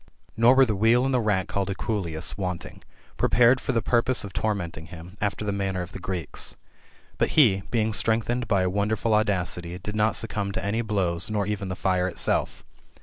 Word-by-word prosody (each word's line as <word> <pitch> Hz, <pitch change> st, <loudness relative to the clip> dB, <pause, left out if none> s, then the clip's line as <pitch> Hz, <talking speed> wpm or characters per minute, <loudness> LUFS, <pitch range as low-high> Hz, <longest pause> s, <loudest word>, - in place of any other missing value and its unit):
Nor 115 Hz, +3 st, +5 dB
were 135 Hz, 0 st, +6 dB
the 110 Hz, -4 st, -1 dB
wheel 115 Hz, +5 st, +3 dB
aiid 135 Hz, -, 0 dB
the 130 Hz, -, +2 dB
mck 100 Hz, -4 st, +1 dB
called 100 Hz, 0 st, -2 dB
equuleus 95 Hz, -5 st, 0 dB
wanting, 90 Hz, -3 st, -5 dB, 0.4 s
prepared 125 Hz, +2 st, +4 dB
for -, -, -1 dB
the 115 Hz, -, 0 dB
purpose 120 Hz, +1 st, +1 dB
qf 100 Hz, -2 st, -8 dB
tormenting 85 Hz, -7 st, -3 dB
him, 85 Hz, +2 st, -11 dB
after 105 Hz, +1 st, -2 dB
the 100 Hz, -, -1 dB
manner 95 Hz, -2 st, -2 dB
of 90 Hz, -, -10 dB
the -, -, -8 dB
Greeks. 90 Hz, -3 st, -2 dB, 0.6 s
But -, -, +2 dB
he, 105 Hz, -10 st, +5 dB
beiqg 110 Hz, -2 st, +1 dB
strengthened 115 Hz, +3 st, 0 dB
by 95 Hz, -3 st, +2 dB
a -, -, +1 dB
wonderful 105 Hz, +3 st, 0 dB
audacity, 90 Hz, -5 st, 0 dB
did 105 Hz, +3 st, -6 dB
not 110 Hz, +1 st, +2 dB
succumb 105 Hz, -3 st, -2 dB
to 95 Hz, 0 st, -3 dB
any 110 Hz, +3 st, 0 dB
blows, 95 Hz, -6 st, -1 dB
nor 105 Hz, -2 st, 0 dB
even 100 Hz, -2 st, -3 dB
to 95 Hz, -, -3 dB
fire 90 Hz, -1 st, 0 dB
itself. 90 Hz, -, -1 dB
100 Hz, 195 wpm, -25 LUFS, 95-110 Hz, 0.6 s, were